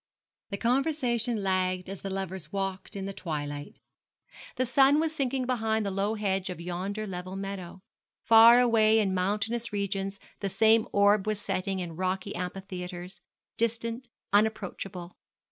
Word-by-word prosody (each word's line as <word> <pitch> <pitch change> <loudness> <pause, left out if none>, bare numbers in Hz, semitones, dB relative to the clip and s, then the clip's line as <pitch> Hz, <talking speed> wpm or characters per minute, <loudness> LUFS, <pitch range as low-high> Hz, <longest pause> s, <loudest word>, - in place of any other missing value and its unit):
The 200 - -3
conversation 245 -2 +1
flagged 185 -2 0
as 195 0 -7
the 195 - -4
lovers 190 -2 -4
walked 195 +1 -4
in 195 -1 -4
the 195 - -4
twilight. 145 -5 -5 0.8
The 255 - +1
sun 270 +4 +5
was 320 0 0
sinking 265 -3 -1
behind 220 -3 0
the 200 - -1
low 200 +3 0
hedge 195 -3 -1
of 180 - -6
yonder 185 +5 -4
level 185 -1 -6
meadow. 195 -2 -6 0.4
Far 230 +2 +8
away 225 -3 +4
in 200 -4 +2
mountainous 210 +6 -1
regions 195 -1 -2 0.2
the 200 - -2
same 220 +4 +4
orb 205 0 +4
was 215 -1 0
setting 195 -1 -2
in 175 -3 -5
rocky 185 +2 -2
amphitheatres, 180 0 -6 0.4
distant, 230 +2 -2 0.3
unapproachable. 195 -4 -1
200 Hz, 145 wpm, -28 LUFS, 185-225 Hz, 0.8 s, Far